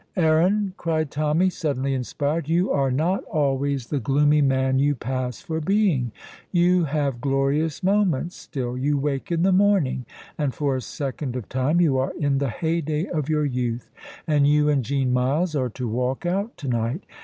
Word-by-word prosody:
"Aaron," 180 Hz, +5 st, +2 dB
cried 155 Hz, -3 st, -1 dB
Tommy, 155 Hz, +5 st, +1 dB
suddenly 140 Hz, -5 st, -1 dB
inspired, 145 Hz, +4 st, -2 dB
"you 175 Hz, +4 st, +2 dB
are 135 Hz, -2 st, +2 dB
not 160 Hz, +9 st, 0 dB
always 140 Hz, -4 st, 0 dB
the 145 Hz, +3 st, -2 dB
gloomy 145 Hz, +4 st, +3 dB
man 130 Hz, -1 st, +2 dB
you 145 Hz, +1 st, +2 dB
pass 125 Hz, 0 st, -4 dB
for 160 Hz, 0 st, -3 dB
being. 180 Hz, -, +1 dB, 0.4 s
You 175 Hz, -1 st, +3 dB
have 140 Hz, -4 st, -1 dB
glorious 140 Hz, +4 st, 0 dB
moments 185 Hz, -4 st, +1 dB
still. 125 Hz, -3 st, -5 dB
You 145 Hz, +3 st, 0 dB
wake 140 Hz, +2 st, -2 dB
in 170 Hz, 0 st, +1 dB
the 190 Hz, -, +4 dB
morning, 185 Hz, -, +2 dB, 0.3 s
and 145 Hz, -4 st, -1 dB
for 140 Hz, -3 st, 0 dB
a 130 Hz, -, -2 dB
second 135 Hz, -1 st, -4 dB
of 125 Hz, -5 st, -5 dB
time 130 Hz, +7 st, +1 dB
you 145 Hz, -7 st, +3 dB
are 130 Hz, -, -1 dB
in 140 Hz, -2 st, +1 dB
the 140 Hz, -2 st, 0 dB
heyday 160 Hz, +4 st, -1 dB
of 155 Hz, -3 st, -2 dB
your 150 Hz, -1 st, +1 dB
youth, 125 Hz, -3 st, -3 dB, 0.3 s
and 145 Hz, -2 st, +3 dB
you 150 Hz, 0 st, +3 dB
and 140 Hz, -3 st, +2 dB
Jean 130 Hz, 0 st, 0 dB
Myles 145 Hz, +7 st, +1 dB
are 130 Hz, -3 st, 0 dB
to 125 Hz, +2 st, -5 dB
walk 125 Hz, +7 st, -2 dB
out 200 Hz, +6 st, -1 dB
to 140 Hz, -, -7 dB
night. 120 Hz, -, -1 dB
145 Hz, 180 wpm, -24 LUFS, 130-165 Hz, 0.4 s, the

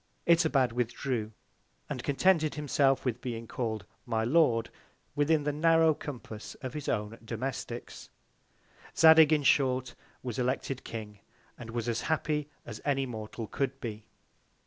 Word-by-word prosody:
Itobad 160 Hz, -7 st, +4 dB
withdrew, 120 Hz, -1 st, -2 dB, 0.6 s
and -, -, -5 dB
contented 155 Hz, +1 st, +2 dB
himself 140 Hz, -2 st, +2 dB
with 125 Hz, -1 st, -1 dB
being 115 Hz, -3 st, -4 dB
call'd 110 Hz, -4 st, -3 dB, 0.2 s
my 110 Hz, -2 st, 0 dB
Lord 120 Hz, -3 st, +3 dB, 0.4 s
within 150 Hz, +1 st, +2 dB
the 150 Hz, 0 st, -1 dB
narrow 165 Hz, +1 st, +4 dB
Compass 120 Hz, -7 st, -8 dB
of 130 Hz, -, -7 dB
his 150 Hz, -2 st, -4 dB
own 105 Hz, +1 st, -2 dB
Domesticks. 120 Hz, +1 st, -5 dB, 0.9 s
Zadig, 160 Hz, -1 st, +8 dB
in 150 Hz, -2 st, +3 dB
short, 130 Hz, -2 st, +2 dB, 0.3 s
was 125 Hz, -1 st, -4 dB
elected 130 Hz, +1 st, -1 dB
King, 105 Hz, -3 st, -7 dB, 0.4 s
and 120 Hz, -2 st, -10 dB
was 115 Hz, 0 st, -3 dB
as 120 Hz, -1 st, 0 dB
happy 150 Hz, -2 st, -1 dB, 0.2 s
as 110 Hz, -2 st, -8 dB
any 135 Hz, -2 st, +1 dB
Mortal 110 Hz, -1 st, -6 dB
could 135 Hz, +4 st, -2 dB
be. 110 Hz, -2 st, -6 dB
130 Hz, 135 wpm, -30 LUFS, 115-150 Hz, 0.9 s, Zadig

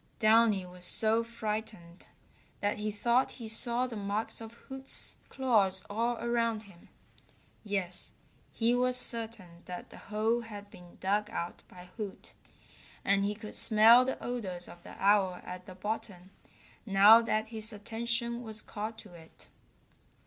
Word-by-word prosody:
Downy 215 Hz, -3 st, +4 dB
was 180 Hz, 0 st, -11 dB
so 220 Hz, +4 st, +4 dB
frightened 215 Hz, -6 st, -6 dB, 0.5 s
that 205 Hz, +1 st, -1 dB
he 210 Hz, 0 st, -2 dB
thought 235 Hz, +5 st, +1 dB
he 230 Hz, -3 st, -8 dB
saw 235 Hz, +3 st, +1 dB
the 245 Hz, -2 st, -6 dB
marks 210 Hz, +3 st, -3 dB
of 225 Hz, 0 st, -9 dB
Hoot's 265 Hz, +2 st, -4 dB
claws 205 Hz, -8 st, +2 dB
all 230 Hz, +3 st, 0 dB
around 230 Hz, -2 st, 0 dB
him. 190 Hz, -4 st, -18 dB, 0.7 s
Yes, 195 Hz, -4 st, -3 dB, 0.4 s
he 230 Hz, +1 st, +1 dB
was 250 Hz, 0 st, +2 dB
certain 220 Hz, -9 st, 0 dB
that 180 Hz, -1 st, -8 dB
the -, -, -12 dB
hole 220 Hz, +3 st, 0 dB
had 205 Hz, -3 st, -10 dB
been 175 Hz, -1 st, -15 dB
dug 205 Hz, +2 st, 0 dB
out 175 Hz, -6 st, -5 dB
by 180 Hz, 0 st, -14 dB
Hoot, 205 Hz, -4 st, -7 dB, 0.7 s
and 200 Hz, 0 st, +3 dB
he 205 Hz, +1 st, -1 dB
could 215 Hz, 0 st, -9 dB
smell 225 Hz, +3 st, +7 dB
the 260 Hz, +1 st, -2 dB
odors 190 Hz, -8 st, -4 dB
of 175 Hz, -, -13 dB
the -, -, -12 dB
owl 195 Hz, -2 st, +3 dB
at 180 Hz, 0 st, -8 dB
the 185 Hz, -, -10 dB
bottom 200 Hz, -2 st, -5 dB, 0.5 s
now 205 Hz, +2 st, +7 dB
that 220 Hz, -1 st, -1 dB
his 220 Hz, -1 st, -1 dB
attention 235 Hz, +2 st, -2 dB
was 220 Hz, -2 st, -3 dB
called 215 Hz, +2 st, -6 dB
to 205 Hz, -5 st, -13 dB
it. 160 Hz, -1 st, -14 dB
215 Hz, 150 wpm, -31 LUFS, 195-230 Hz, 0.7 s, smell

